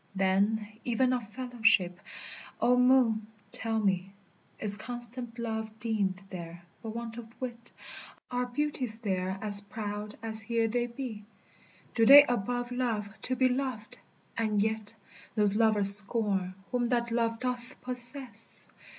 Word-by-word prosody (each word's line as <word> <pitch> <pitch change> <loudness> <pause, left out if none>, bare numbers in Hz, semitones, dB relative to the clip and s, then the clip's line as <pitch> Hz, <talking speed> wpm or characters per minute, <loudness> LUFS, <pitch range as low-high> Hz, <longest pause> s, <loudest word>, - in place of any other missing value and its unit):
Then, 200 +3 0 0.2
even 255 +2 0
of 240 -5 -4
fellowship, 225 -7 0 0.6
O 250 - +3
Moon, 250 -4 +2 0.2
tell 225 0 -3
me, 195 -2 -1 0.4
Is 205 -2 +6
constant 240 +1 -6
love 220 -2 -5
deemed 205 -4 -2
there 170 -1 -9 0.2
but 220 0 -8
want 235 0 -6
of 230 0 -14
wit? 240 -2 -8 0.6
Are 250 0 -2
beauties 255 -3 -2
there 190 -4 -3
as 205 -1 +6
proud 210 0 -7
as 220 -1 -1
here 230 +1 -1
they 240 +2 -2
be? 235 -3 -8 0.7
Do 225 -1 +2
they 285 +2 +10
above 245 0 -3
love 230 -5 -3
to 255 - -2
be 255 0 +2
loved, 255 -4 -4 0.4
and 215 -2 -1
yet 220 +1 -2 0.4
Those 210 -1 +7
lovers 210 -3 +8
scorn 200 -3 -1 0.2
whom 245 -1 -1
that 235 -2 -1
love 230 -1 -1
doth 250 -1 -5
possess? 245 -2 +1
225 Hz, 135 wpm, -28 LUFS, 210-245 Hz, 0.7 s, they